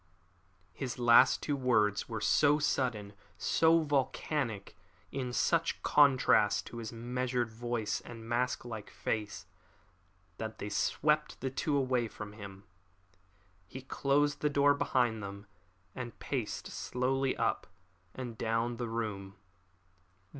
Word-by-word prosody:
His 125 -3 -5
last 120 -1 +5
two 145 - 0
words 110 -6 +1
were 110 -1 -3
so 145 +4 +4
sudden, 120 -8 -1 0.2
so 160 - +3
volcanic, 135 -5 -1 0.4
in 130 -2 -3
such 165 +6 +1
contrast 130 -7 +4
to 120 - -9
his 115 -2 -5
measured 120 0 -2
voice 115 -2 -2
and 115 -1 -10
mask 125 +2 -1
like 110 -3 -7
face, 105 -2 -3 0.9
that 110 0 -5
they 105 - -5
swept 150 +8 0
the 130 - -3
two 145 +2 0
away 130 -3 +1
from 105 -1 -9
him. 100 -2 -10 1.0
He 130 +7 -9
closed 145 +2 +1
the 150 - +2
door 145 0 +4
behind 120 -5 +1
them 100 +1 -7 0.5
and 120 -4 -7
paced - - -4
slowly 130 +1 -1
up 115 - 0 0.5
and 125 -3 -6
down 115 +1 0
the 120 - -3
room. 105 -4 -4
120 Hz, 125 wpm, -32 LUFS, 110-135 Hz, 1.0 s, last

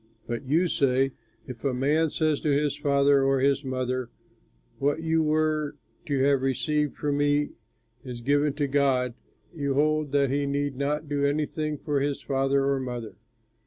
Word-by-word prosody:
But 120 +3 -5
you 165 +6 +3
say, 135 -3 +2 0.3
'If 125 -3 -9
a 135 -3 0
man 150 +5 +2
says 155 -1 0
to 155 - 0
his 145 0 +1
father 140 -1 +3
or 135 0 +2
to 130 - +2
his 140 +1 +2
mother, 130 -2 -2 0.7
What 145 +3 0
you 160 0 +2
were 155 -1 0 0.3
to 140 -2 0
have 140 -1 +3
received 150 +3 0
from 145 -1 -1
me 145 0 +1 0.5
is 125 -3 -7
given 145 +3 +2
to 145 0 -1
God,' 135 -3 +1 0.4
you 140 -4 -2
hold 155 0 +1
that 140 -2 +2
he 140 0 0
need 140 0 -1
not 150 +3 -2
do 145 -1 -1
anything 150 +1 -1
for 145 0 -1
his 140 0 -1
father 135 +1 +1
or 140 -1 +1
mother. 120 -3 -5
140 Hz, 170 wpm, -26 LUFS, 135-150 Hz, 0.7 s, you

